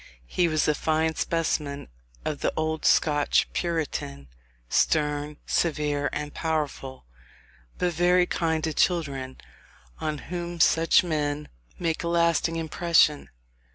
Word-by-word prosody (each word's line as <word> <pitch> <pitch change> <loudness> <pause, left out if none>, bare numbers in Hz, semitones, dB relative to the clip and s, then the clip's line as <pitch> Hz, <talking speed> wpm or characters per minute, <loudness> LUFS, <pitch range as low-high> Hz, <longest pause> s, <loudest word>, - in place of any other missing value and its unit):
He 175 - +1
was 155 -2 +1
a 150 - +4
fine 160 +1 0
specimen 150 -4 -2 0.4
of 150 - -2
the - - 0
old 160 0 -1
Scotch 145 -2 +3
puritan; 145 - -3 0.4
stern, 150 - +1
severe, 150 -3 0
and 150 0 -4
powerful, 150 - -3 0.7
but 180 -1 0
very 180 +2 +3
kind 160 -3 -1
to 160 - -1
children, 140 -7 0 0.6
on 155 -1 -2 0.2
whom 175 -1 -4
such 165 +2 +4
men 150 -3 -2 0.3
make 165 -2 -2
a - - -2
lasting 170 -1 +2
impression. 160 -2 +2
155 Hz, 120 wpm, -26 LUFS, 145-170 Hz, 0.7 s, a